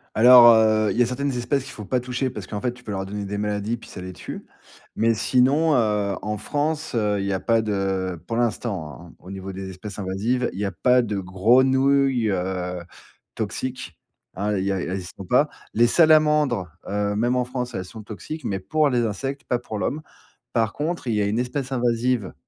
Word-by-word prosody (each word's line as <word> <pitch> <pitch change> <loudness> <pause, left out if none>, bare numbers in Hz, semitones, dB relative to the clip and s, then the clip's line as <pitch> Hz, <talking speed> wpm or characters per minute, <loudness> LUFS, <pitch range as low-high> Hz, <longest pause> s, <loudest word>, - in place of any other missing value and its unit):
Alors, 120 +1 +9
heu, 110 -1 +3
il - - -3
y - - +4
a - - +1
certaines 135 +4 -2
espèces 130 +3 0
qu'il - - -9
faut 105 - -9
pas 125 +4 0
toucher, 125 +1 -2
parce 105 -5 -7
qu'en 105 +1 -5
fait, 125 +2 -2
tu 125 0 -17
peux 110 - -6
leur 95 -1 -3
donner 100 +1 -5
des 100 +1 -4
maladies, 105 +2 -2
puis - - -14
ça - - -8
les 95 0 -6
tue, 90 - -8 0.5
mais 115 +1 +3
sinon, 135 +8 +3
heu, 105 -5 +1
en 105 +1 -3
France, 150 +2 -2 0.2
il 100 - -2
y 100 - -1
a 95 - 0
pas 115 +3 +2
de- 95 -4 -2
pour 115 - -2
l'instant, 105 - -2
hein, - - -18
au 90 - -11
niveau 95 0 -6
des 95 0 -6
espèces 95 +2 -8
invasives- 105 +6 -1
il 95 - -7
y 105 - 0
a 100 - -2
pas 125 +8 +3
de 105 -4 -3
grenouilles, 130 +6 +3
heu, 90 -1 -2 0.6
toxiques, 130 -10 -4 0.4
hein, 105 +1 -1
il 95 - -1
y 100 - +1
a 95 - -2
il - - -4
y - - -4
a - - -3
elles - - -3
y - - -9
sont 95 - -7
pas. 125 +9 +3 0.3
Les 120 +2 +4
salamandres, 150 - +4 0.2
heu, 105 0 -1
même 120 +4 +1
en 125 - +1
France, 125 0 -4
elles 95 -3 -4
sont 110 +4 -10
toxiques, 130 +9 -7
mais 95 -1 -2
pour 150 +10 +1
les 120 -3 +1
insectes, 135 +6 -4
pas 125 - 0
pour 110 -3 -6
l'homme. 145 +8 -2 0.5
Par 115 -3 +1
contre, 155 -2 -3
il 115 - +1
y 105 - +1
a - - +1
une 105 +4 0
espèce 130 +2 -3
invasive, 120 -3 0
115 Hz, 225 wpm, -23 LUFS, 100-125 Hz, 0.6 s, Alors